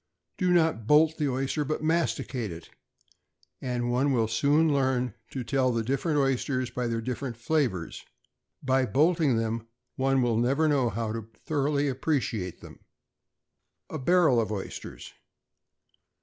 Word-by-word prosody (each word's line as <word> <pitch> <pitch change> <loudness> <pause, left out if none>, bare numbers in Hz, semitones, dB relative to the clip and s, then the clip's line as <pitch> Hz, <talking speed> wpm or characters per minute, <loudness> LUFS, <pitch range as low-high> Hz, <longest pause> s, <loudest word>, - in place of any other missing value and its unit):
Do 180 -2 +1
not 160 -11 +2
bolt 155 +3 +4
the 150 -2 +1
oyster, 135 +3 -1
but 155 +1 -3
masticate 130 - -1
it; 85 0 -10 0.9
and 120 -1 -2
one 135 +4 +2
will 115 -4 +2
soon 145 +7 +2
learn 130 -4 +1 0.2
to 130 - -5
tell 130 +2 +1
the 115 -1 -1
different 140 +6 0
oysters 130 -2 0
by 125 0 -2
their 115 -1 -2
different 125 0 -4
flavors. 120 - -1 0.6
By 130 -1 +2
bolting 155 -2 +3
them, 115 0 -2 0.3
one 135 -1 +2
will 120 -2 +1
never 135 +7 +2
know 135 -5 +2
how 115 +1 -3
to 115 -1 -6 0.2
thoroughly 145 -1 0
appreciate 125 - -2
them. - - -13 1.1
=A 155 - -4
Barrel 155 -4 +4
of 110 - -3
Oysters. 95 - -7
130 Hz, 140 wpm, -27 LUFS, 115-145 Hz, 1.1 s, bolt